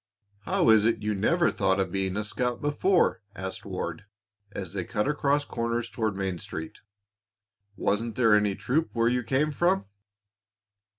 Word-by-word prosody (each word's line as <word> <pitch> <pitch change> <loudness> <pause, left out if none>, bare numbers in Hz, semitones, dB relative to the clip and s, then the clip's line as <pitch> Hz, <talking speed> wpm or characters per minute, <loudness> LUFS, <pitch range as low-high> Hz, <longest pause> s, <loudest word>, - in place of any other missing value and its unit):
"How - - +3
is 110 -1 +5
it 115 - 0
you 105 0 0
never 170 - +2
thought 95 0 +1
of 95 -2 0
being 95 0 -1
a 105 - -1
scout 120 +3 -2
before?" 145 - +2
asked 95 0 -6
Ward, - - -5 0.5
as 95 -3 -6
they 95 -2 -2
cut 105 +4 -1
across 145 -1 +1
corners 115 -1 -2
toward 110 -4 -1
Main 95 -3 -2
Street. 80 +1 -7 1.0
"Wasn't 110 +4 -1
there 115 -4 +4
any 105 -1 +3
troop 155 +10 0
where 115 0 +2
you 125 0 +1
came 135 +6 +1
from?" 175 - +1
115 Hz, 160 wpm, -27 LUFS, 100-130 Hz, 1.0 s, is